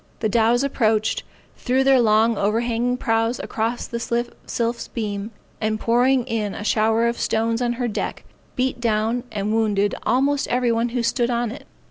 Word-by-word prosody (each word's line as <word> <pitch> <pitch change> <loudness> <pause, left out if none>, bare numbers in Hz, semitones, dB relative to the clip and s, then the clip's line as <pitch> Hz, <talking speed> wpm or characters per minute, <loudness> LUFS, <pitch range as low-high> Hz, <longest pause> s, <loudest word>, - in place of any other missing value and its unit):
The 220 - +1
dows 230 +4 +3
approached, 220 -5 +1 0.4
threw 260 +1 +1
their 270 -1 +5
long 225 +1 +3
overhanging 235 +4 0
prows 225 +1 0
across 230 +2 -2
the 235 - -5 0.5
Sylph's 235 0 -2
beam, 205 -2 -4 0.3
and 215 0 0
pouring 245 +2 +2
in 220 -4 -2
a - - -6
shower 220 +2 +2
of 235 0 -1
stones 225 +1 0
on 240 -1 +1
her 245 0 -2
deck, 215 - -4 0.3
beat 255 -1 -1
down 225 +1 0
and 210 0 -2
wounded 205 -2 +1
almost 275 +4 +1
every 245 0 +1
one 230 +1 +1
who 240 0 -2
stood 240 +1 +1
on 235 -2 0
it. 260 - -10
230 Hz, 165 wpm, -22 LUFS, 220-245 Hz, 0.5 s, their